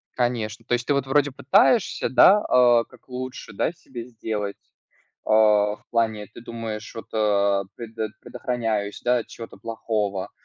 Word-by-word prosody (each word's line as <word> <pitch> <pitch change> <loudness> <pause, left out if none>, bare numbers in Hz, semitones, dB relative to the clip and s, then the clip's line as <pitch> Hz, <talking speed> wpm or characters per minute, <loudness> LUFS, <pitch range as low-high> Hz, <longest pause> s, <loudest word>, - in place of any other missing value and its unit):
Конечно. 120 -3 -1
То - - -2
есть 120 0 0
ты, 145 - +3
вот, 140 -1 0
вроде, 145 +1 +2
пытаешься, 190 - +3
да, 190 +9 +7
а, 120 -2 +5
как - - -20
лучше, 130 +1 -6
да, - - 0
себе 130 -8 -9
сделать, 110 -4 -4 0.7
а, 105 -1 +4
в - - -29
плане 110 -3 0
ты 110 - -13
думаешь, 115 -2 -6
вот, 115 - -8
а, 100 -2 +2
предот 110 -2 -5
предохраняюсь, 110 -5 -3
да, 125 0 +3
от 115 - -5
чего-то 115 - -10
плохого, 105 -4 -3
115 Hz, 155 wpm, -24 LUFS, 105-125 Hz, 0.7 s, да